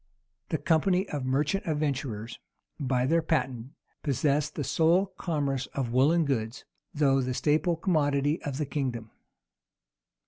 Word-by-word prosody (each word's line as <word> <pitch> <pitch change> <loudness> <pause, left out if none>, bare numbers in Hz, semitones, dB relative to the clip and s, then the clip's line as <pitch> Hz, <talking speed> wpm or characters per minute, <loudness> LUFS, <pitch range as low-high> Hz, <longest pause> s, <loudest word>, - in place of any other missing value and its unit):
The - - 0
company 180 +4 +2
of 145 -3 -3
merchant 150 +9 0
adventurers, 140 -7 -2 0.4
by 130 -3 +1
their 165 +5 +3
patent, 130 -5 -2 0.3
possessed 145 +1 0
the 145 - -2
sole 165 +7 +3
commerce 140 -6 -1
of 125 -4 -2
woollen 155 +6 +4
goods, 115 -4 -2 0.3
though 140 -5 +2
the 130 0 -2
staple 155 +5 +2
commodity 150 -3 +1
of 140 -2 -4
the 150 - -1
kingdom. 125 -6 -3
145 Hz, 130 wpm, -28 LUFS, 130-160 Hz, 0.4 s, woollen